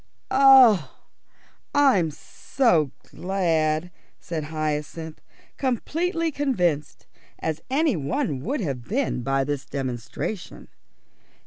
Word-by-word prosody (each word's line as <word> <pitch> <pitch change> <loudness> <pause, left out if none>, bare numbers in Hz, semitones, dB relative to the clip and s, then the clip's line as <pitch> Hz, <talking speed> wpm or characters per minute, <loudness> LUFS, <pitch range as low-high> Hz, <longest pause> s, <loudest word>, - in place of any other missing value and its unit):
"Oh, 260 - +6 0.8
I'm 260 - +4
so 160 - 0 0.2
glad," 170 -3 0 0.3
said 160 -3 -5
Hyacinth, 155 +1 -4 0.4
completely 330 - -1
convinced, 180 - -1 0.3
as 160 -1 -3
any 285 -1 +2
one 150 - -2
would 270 - -2
have 135 -9 -3
been, 240 - -1
by 135 +2 0
this 145 0 -3
demonstration. 130 - -5
170 Hz, 90 wpm, -24 LUFS, -, 0.8 s, Oh